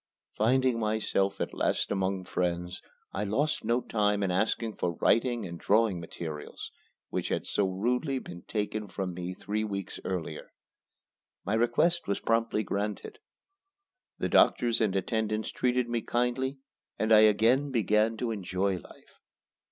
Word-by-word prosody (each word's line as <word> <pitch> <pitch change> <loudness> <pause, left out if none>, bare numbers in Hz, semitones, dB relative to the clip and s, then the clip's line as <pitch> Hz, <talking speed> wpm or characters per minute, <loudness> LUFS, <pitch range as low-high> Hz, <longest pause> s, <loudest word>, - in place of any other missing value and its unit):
Finding 125 +2 +2
myself 105 -3 0
at - - -2
last - - 0
among 95 -1 0
friends, 90 0 -2 0.3
I 100 - -1
lost 135 +10 0
no 120 +2 +1
time 105 -3 +1
in 95 - +1
asking 110 +3 0
for 85 - -1
writing 120 +4 +2
and 85 -2 -7
drawing 105 -3 +2
materials, 80 -2 -7 0.4
which - - -2
had - - -1
so 100 - +1
rudely 125 +9 0
been 85 -8 -8
taken 105 0 -2
from 95 -2 -4
me 90 +1 -5
three 105 +3 -2
weeks 100 -3 -4
earlier. 90 -3 -4 0.9
My 100 - -1
request 150 +10 +2
was 100 - 0
promptly 115 -1 +1
granted. 105 - -3 1.0
The - - -1
doctors 120 -1 +4
and 105 -4 +1
attendants 110 +2 -1
treated 125 -1 +1
me 120 -1 -1
kindly 125 +4 -1 0.4
and 110 0 0
I 110 - +9
again 115 +6 +4
began 110 -2 +2
to 120 -1 -2
enjoy 95 -2 -1
life. - - -18
110 Hz, 145 wpm, -29 LUFS, 95-120 Hz, 1.0 s, I